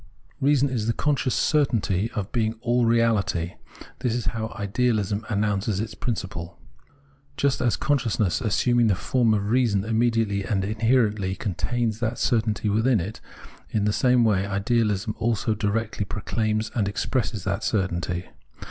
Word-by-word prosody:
Reason 140 0 +3
is 120 -5 -2
the 115 - +2
conscious 140 -2 0
certamty 115 - +1
of 100 -4 -4
being 110 -2 0
all 120 0 +2
reaUty. 110 -7 +1 0.5
This 125 -3 0
is 120 - -2
how 110 -1 -2
Ideahsm 105 0 0
announces 105 -1 0
its 110 +1 -3
principle.* 90 -7 -4 0.8
Just 140 -1 +1
as 120 -2 +2
consciousness 120 - 0
assuming 120 +1 +2
the 100 - +3
form 120 +4 +1
of 100 +1 -1
reason 115 -6 +2
immediately 115 -3 +1
and 95 -2 -1
inherently 110 -3 +1
contains 110 +4 -2
that 120 0 -2
certainty 110 -4 0
within 110 +3 +3
it, 100 +6 -6 0.5
in 105 -2 0
the 105 - +2
same 125 0 +3
way 105 -4 +3
ideahsm 105 +1 0
also 115 -1 0
directly 105 +1 -1
proclaims 110 +1 -2
and 105 -5 0
expresses 105 0 -2
that 100 0 -2
certainty. 90 -3 -1
110 Hz, 140 wpm, -25 LUFS, 100-120 Hz, 0.8 s, Reason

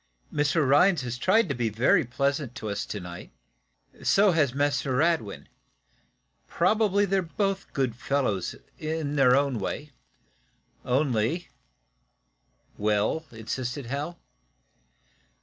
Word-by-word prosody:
"Mr. 145 0 +2
Rhinds 150 +3 +4
has 120 -1 -3
tried 210 - +3
to 140 - -1
be 120 -3 -1
very 110 +5 +3
pleasant 140 +1 -1
to 110 -5 -5
us 100 - -3
to 105 - -4
night. 90 -1 -9 0.7
So 200 0 +4
has 155 -6 +2
Mr. 140 -2 0
Radwin. 155 - 0 1.0
Probably 205 -2 +2
they're 195 0 +1
both 195 +3 -2
good 130 -5 -1
fellows, 125 -8 -1 0.2
in 155 -2 -3
their 130 -3 +5
own 140 -4 +1
way. 145 +9 -4 0.9
Only 130 +4 0 0.6
" - - -41
"Well?" 105 +9 +1
insisted 120 +4 -5
Hal. 145 +7 -4
140 Hz, 115 wpm, -27 LUFS, 115-160 Hz, 1.0 s, their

